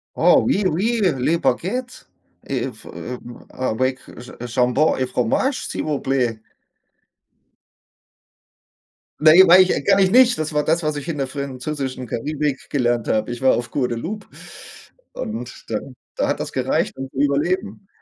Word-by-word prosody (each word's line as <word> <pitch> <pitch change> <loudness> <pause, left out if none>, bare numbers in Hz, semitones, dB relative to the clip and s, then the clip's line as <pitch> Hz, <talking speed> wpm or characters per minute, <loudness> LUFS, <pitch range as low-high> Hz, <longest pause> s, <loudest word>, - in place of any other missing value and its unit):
Oh, - - +5
oui, 205 - +1
oui, 220 +8 0 0.2
les 155 +7 +2
Baguettes, 235 +9 -2 0.4
äh - - -1
v - - -17
äh 125 0 -6 0.3
avec 130 +1 -1 0.2
j 125 - -10 0.2
jambon 125 +5 +2
et 130 - 0
fromage, 125 - 0
s'il - - -4
vous 150 -2 -1
plaît. 125 -4 -1 2.8
Na, 155 0 +7
ja, 190 +3 +8
weil 180 +2 +9
ich 180 -6 -1
kann - - +4
ich 190 -1 +3
nicht. 245 +1 +6
Das 155 0 -3
war 150 - +1
das, 165 +3 +1
was 150 -1 -1
ich 145 - -6
in 165 -3 -3
der 135 - -1
französischen 135 -1 -5
Karibik 145 +4 -3
gelernt 120 -4 0
habe. 110 +2 0
Ich 120 - -6
war 130 - +5
auf 120 -1 -4
Guadeloupe 145 - -3 0.9
und 115 +3 -6
dann 120 +4 -4 0.2
da - - 0
hat - - -1
das - - -4
gereicht, - - -1
um 135 0 -6
zu - - -13
überleben. 185 +8 -1
140 Hz, 155 wpm, -21 LUFS, 125-170 Hz, 2.8 s, weil